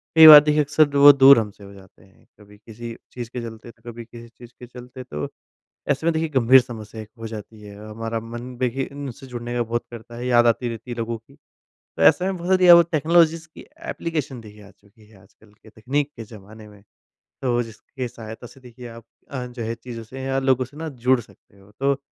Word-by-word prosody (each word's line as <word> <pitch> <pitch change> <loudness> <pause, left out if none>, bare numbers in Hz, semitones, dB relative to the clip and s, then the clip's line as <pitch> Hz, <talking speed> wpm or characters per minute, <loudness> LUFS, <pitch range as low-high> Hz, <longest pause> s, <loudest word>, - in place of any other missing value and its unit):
कई 160 -1 +10
बार 150 -1 +13
देखिए 150 0 +2
अक्सर 150 +1 +3
दू 140 -1 -1
वो 145 - +11
दूर 135 -2 +7
हम 105 -2 -4
से 100 - -18
हो 100 - -13
जाते 95 -2 -18
हैं। 95 0 -25
कभी 105 0 -18
किसी 115 +2 -10 0.2
चीज़ 120 -2 -7
के 125 -1 -6
चलते, 115 0 -10
तो 120 - -12
कभी 115 0 -10
किसी 115 0 -13
चीज़ 120 0 -16
के 125 - -11
चलते 125 +1 -11
तो 75 -12 -6 0.6
ऐसे 140 +3 -1
में 170 - +3
देखिए 160 0 -2
गंभीर 130 -2 +5
समस्या 110 -3 -9
एक 105 - -14
हो 115 - -7
जाती 110 0 -10
है। 105 -1 -12
हमारा 115 +1 -5
मन 120 +2 -9
देखिए 130 +1 -2
इनसे 140 -2 -9
जुड़ने 120 -1 -7
का 120 - 0
बहुत 120 +1 -3
करता 120 0 -11
है 120 +1 -6
याद 120 -1 +4
आती 120 +1 +1
रहती 115 +2 -8
है 120 - -5
लोगों 115 0 -3
की। 115 +5 -24 0.4
तो - - -8
ऐसे 80 - +5
में 190 0 -2
बहुत 175 0 -7
सारी 185 -1 +4
अ, 175 - +10
वो 170 - +7
टेक्नोलॉजीज़ 165 0 +1
की - - -12 0.2
एप्लीकेशन 150 -7 -4
देखिए 105 -1 -15
आ 100 - -16
चुकी 105 +2 -25
है 110 - -21
आजकल 105 +2 -24
के 105 +1 -21
तकनीक 135 +7 -3
के 115 - -8
ज़माने 105 0 -14
में। 105 -1 -18 0.6
तो 120 -2 0
जिसकी 125 +3 -8
सहायता 110 0 -10
से 135 - -18
देखिए 125 -1 -12
आप 115 0 -12 0.3
अ, 130 -3 -5
जो 125 -1 -8
है 115 +1 -4
चीज़ों 115 0 -9
से 130 +4 -10
या 135 0 -1
लोगों 130 -1 +1
से 140 +3 -17
ना 160 0 -5
जुड़ 130 -1 +1
सकते 105 -2 -23
हो। 100 +1 -21
तो 140 0 0
120 Hz, 235 wpm, -22 LUFS, 110-135 Hz, 0.6 s, बार